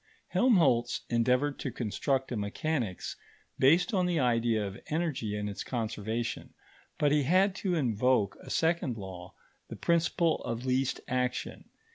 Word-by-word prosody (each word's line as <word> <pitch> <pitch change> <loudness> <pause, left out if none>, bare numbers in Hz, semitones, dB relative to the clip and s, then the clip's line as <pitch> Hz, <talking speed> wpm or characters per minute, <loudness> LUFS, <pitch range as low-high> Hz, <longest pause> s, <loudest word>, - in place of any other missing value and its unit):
Helmholtz 165 - +3
endeavoured 125 +5 +2
to 135 - -3
construct 130 +3 -1
a - - -1
mechanics 110 - -2 0.4
based 165 - +4
on 185 -2 +2
the 175 -3 +1
idea 115 -4 +2
of 100 0 -7
energy 150 -10 -2
and 105 0 -3
its 100 - -5
conservation, 115 -1 -3 0.4
but 145 -1 +2
he 150 0 +4
had 185 +7 +3
to 185 -3 -1
invoke 125 - +1
a - - -11
second 160 -7 +1
law, 95 -3 -9 0.3
the - - -7
principle 170 -1 +2
of 115 +2 -4
least 130 +1 0
action. 125 -1 -2
125 Hz, 140 wpm, -30 LUFS, 110-160 Hz, 0.4 s, based